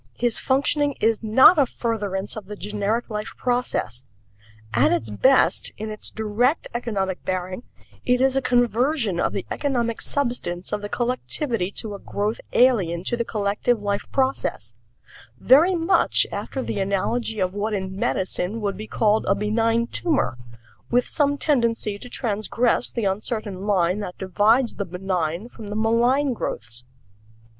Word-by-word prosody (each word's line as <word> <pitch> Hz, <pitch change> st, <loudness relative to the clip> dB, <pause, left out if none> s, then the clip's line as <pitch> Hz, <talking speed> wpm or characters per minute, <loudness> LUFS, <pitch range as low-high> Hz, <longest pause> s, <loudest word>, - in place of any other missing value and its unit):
His 240 Hz, -1 st, 0 dB
functioning 285 Hz, +1 st, +1 dB
is 225 Hz, 0 st, +2 dB
not 260 Hz, +9 st, +6 dB
a 275 Hz, -, +4 dB
furtherance 205 Hz, -5 st, -3 dB
of 210 Hz, -4 st, -8 dB
the 210 Hz, -, -6 dB
generic 210 Hz, +3 st, -2 dB
life 210 Hz, 0 st, -5 dB
process. 245 Hz, -, -1 dB, 0.7 s
At 120 Hz, +4 st, +4 dB
its 110 Hz, -2 st, -1 dB
best, 260 Hz, -, +3 dB
in 215 Hz, 0 st, -5 dB
its 215 Hz, -, -3 dB
direct 220 Hz, +7 st, 0 dB
economic 200 Hz, -6 st, -2 dB
bearing, 185 Hz, +2 st, -3 dB, 0.4 s
it 250 Hz, 0 st, +2 dB
is 265 Hz, 0 st, +3 dB
a 270 Hz, -, +2 dB
conversion 245 Hz, -, +1 dB
of -, -, +1 dB
the 195 Hz, -, -4 dB
economic 240 Hz, -5 st, -1 dB
substance 240 Hz, -10 st, -2 dB
of 205 Hz, -, -1 dB
the 205 Hz, -, -5 dB
collectivity 245 Hz, -, -1 dB
to 220 Hz, -3 st, -2 dB
a 200 Hz, -, -7 dB
growth 210 Hz, +3 st, -3 dB
alien 190 Hz, -10 st, +3 dB
to 240 Hz, -, -1 dB
the 235 Hz, -, -1 dB
collective 215 Hz, +2 st, 0 dB
life 200 Hz, -1 st, -3 dB
process 265 Hz, 0 st, -1 dB, 0.7 s
very 325 Hz, +8 st, +5 dB
much 335 Hz, +3 st, +4 dB
after 265 Hz, -, -4 dB
the -, -, -3 dB
analogy 215 Hz, +3 st, -1 dB
of 185 Hz, -1 st, 0 dB
what 210 Hz, +1 st, -2 dB
in 190 Hz, -1 st, -4 dB
medicine 190 Hz, +2 st, -1 dB
would 200 Hz, -2 st, -2 dB
be 215 Hz, -, -7 dB
called 215 Hz, -1 st, +2 dB
a 195 Hz, -, +3 dB
benign 225 Hz, +3 st, +1 dB
tumor, 300 Hz, -, 0 dB, 0.5 s
with 245 Hz, 0 st, +2 dB
some 285 Hz, -2 st, +1 dB
tendency 235 Hz, -8 st, 0 dB
to 245 Hz, -, -10 dB
transgress 235 Hz, +1 st, 0 dB
the 230 Hz, -4 st, -3 dB
uncertain 205 Hz, 0 st, -3 dB
line 185 Hz, -1 st, +2 dB
that 180 Hz, -4 st, -6 dB
divides 215 Hz, +6 st, +2 dB
the 200 Hz, -, -2 dB
benign 180 Hz, +1 st, -2 dB
from 225 Hz, -3 st, -11 dB
the 205 Hz, -, -5 dB
malign 240 Hz, +5 st, +2 dB
growths. 115 Hz, -, -4 dB
220 Hz, 150 wpm, -23 LUFS, 195-245 Hz, 0.7 s, not